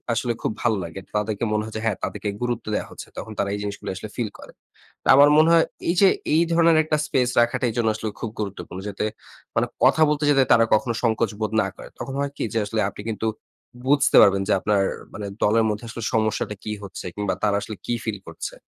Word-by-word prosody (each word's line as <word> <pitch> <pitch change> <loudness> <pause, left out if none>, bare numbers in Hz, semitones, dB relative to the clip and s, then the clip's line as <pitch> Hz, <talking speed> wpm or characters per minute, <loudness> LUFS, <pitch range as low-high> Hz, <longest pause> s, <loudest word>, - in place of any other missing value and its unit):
আসলে 120 +1 0
খুব - - 0
ভালো 115 -3 +2
লাগে। 85 +3 -7 0.2
তাদেরকে 105 +1 -1
মনে 105 0 +1
হয় 110 - -8
যে 110 - -2
হ্যাঁ, 110 -4 +1
তাদেরকে 105 0 -4
গুরুত্ব 120 -2 -2
দেয়া - - -1
হচ্ছে। - - -10
তখন 110 - -6
তারা 100 - 0
এই - - -3
জিনিসগুলি 100 -1 -5
আসলে 110 - -7
ফিল 115 -4 -2
করে। - - -12 0.5
তো - - -30
আমার 145 +1 +8
মনে 155 +1 +6
হয় 165 -1 +6 0.2
এই 170 - +3
যে, 195 - +7 0.3
এই 165 - +5
ধরনের 165 -1 +5
একটা 155 -1 +1
স্পেস 125 -4 +1
রাখাটা, 120 +2 +1
এই 110 - -7
জন্য 115 - +2
আসলে 110 0 -4
খুব 115 - -3
গুরুত্বপূর্ণ। 95 -2 -5
যাতে 100 0 -3 0.5
মানে - - +3 0.2
কথা 160 - +5
বলতে 150 0 0
যেতে 135 -2 +5
তারা 115 - +6
কখনো 120 +2 +1
সংকোচ 115 -1 +1
বোধ 110 0 -1
না - - -2
করে। - - -10
তখন 135 - -5
হয় 140 0 -1
কি - - -2
যে, - - +2
আসলে 110 +1 -1
আপনি 105 - -10
কিন্তু 110 0 -3 0.6
বুঝতে 140 +1 +4
পারবেন 100 -1 +4
যে, - - +3
আপনার 105 -2 +2 0.3
মানে 105 - -5 0.2
দলের 110 +2 +4
মধ্যে 105 +3 -4
আসলে 115 0 -7
সমস্যাটা 110 -1 0
কি 105 - -3
হচ্ছে? 95 -1 -8
কিংবা 105 -1 -1
তারা 105 -1 +2
আসলে 110 - -6
কী 120 - 0
ফিল 110 -3 -3
করছে? 80 - -6
110 Hz, 230 wpm, -23 LUFS, 105-125 Hz, 0.6 s, আমার